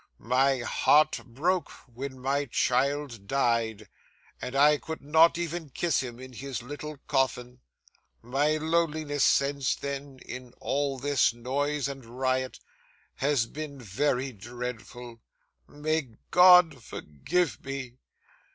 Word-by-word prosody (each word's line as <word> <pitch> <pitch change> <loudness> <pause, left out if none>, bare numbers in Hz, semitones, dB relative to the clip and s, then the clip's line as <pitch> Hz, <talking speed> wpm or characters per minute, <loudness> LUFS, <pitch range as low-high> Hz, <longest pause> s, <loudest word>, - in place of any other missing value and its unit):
My 130 +3 +2
heart 150 +5 +3
broke 165 +8 0 0.2
when 130 +2 -7
my 140 +3 0
child 130 -3 0
died, 115 -5 0 0.5
and 125 - -5
I 145 +1 +5
could 160 -2 -7
not 160 +3 +5
even 170 -2 -4
kiss 165 +2 0
him 120 -2 -5
in 130 0 -10
his 130 -1 -5
little 145 +3 -7
coffin. 125 -2 -1 0.6
My 145 +6 +1
loneliness 155 -2 0
since 140 -1 +2
then, 140 -1 -6
in 125 -1 -8
all 140 -1 -1
this 140 -2 +2
noise 140 +4 -1
and 135 -1 -7
riot, 130 +2 -2 0.6
has 140 -4 +2
been 145 +2 -7
very 130 +4 -1
dreadful. 120 +1 -8 0.5
May 145 -5 -2 0.2
God 180 -2 +7
forgive 155 - -2
me! 130 -2 -6
135 Hz, 115 wpm, -28 LUFS, 125-150 Hz, 0.6 s, God